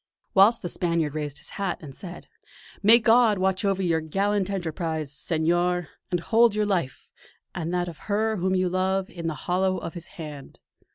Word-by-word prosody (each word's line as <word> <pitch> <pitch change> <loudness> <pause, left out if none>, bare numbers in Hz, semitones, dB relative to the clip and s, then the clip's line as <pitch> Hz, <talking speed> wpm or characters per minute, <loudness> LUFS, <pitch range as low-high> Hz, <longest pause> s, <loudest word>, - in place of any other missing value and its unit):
Whilst 205 +4 +6
the - - -2
Spaniard 170 -4 -1
raised 150 -2 -4
his - - -8
hat 190 -3 -1
and 145 -4 -10
said: 180 +4 -9 0.5
"May 220 +3 +8
God 230 -2 +4
watch 190 +1 0
over 195 -1 +1
your 165 -2 +1
gallant 195 +4 0
enterprise, 160 -5 -3
Senor; 175 +3 0 0.2
and 175 - 0
hold 230 +2 +4
your 210 0 +1
life, 175 -10 -2 0.5
and 170 -1 -3
that 180 0 0
of 170 -3 -8
her 220 +1 +1
whom 185 +1 0
you 185 0 +2
love, 185 +1 0
in 170 -2 -5
the 160 - -2
hollow 185 +1 +1
of 165 -1 -6
His 175 -1 -6
hand!" 150 -4 -9
180 Hz, 180 wpm, -25 LUFS, 165-195 Hz, 0.5 s, May